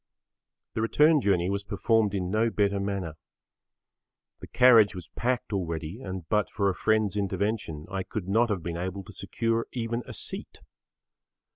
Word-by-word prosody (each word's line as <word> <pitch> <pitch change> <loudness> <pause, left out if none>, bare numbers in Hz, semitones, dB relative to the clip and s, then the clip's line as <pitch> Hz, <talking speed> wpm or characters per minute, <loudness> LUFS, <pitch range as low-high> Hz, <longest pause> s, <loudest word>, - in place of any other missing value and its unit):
The - - -2
return 150 +6 +4
journey 90 -5 +2
was 100 0 -2
performed 105 +1 +1
in 90 -2 -2
no 110 +2 +2
better 100 -2 +1
manner. 100 -5 -3 1.2
The - - -10
carriage 115 -5 +6
was 90 -2 -8
packed 125 -2 -2
already 85 +2 -3
and 95 -5 -6
but 105 +4 +1
for 100 -2 0
a - - -4
friend's 110 +2 +1
intervention 100 -5 -2
I 95 +1 -3
could 95 0 -5
not 115 +4 +3
have 95 -6 -2
been 85 -1 -4
able 95 +2 -4
to - - -12
secure 115 0 -1
even 115 -1 -2
a - - -7
seat. - - -5
100 Hz, 160 wpm, -27 LUFS, 95-115 Hz, 1.2 s, carriage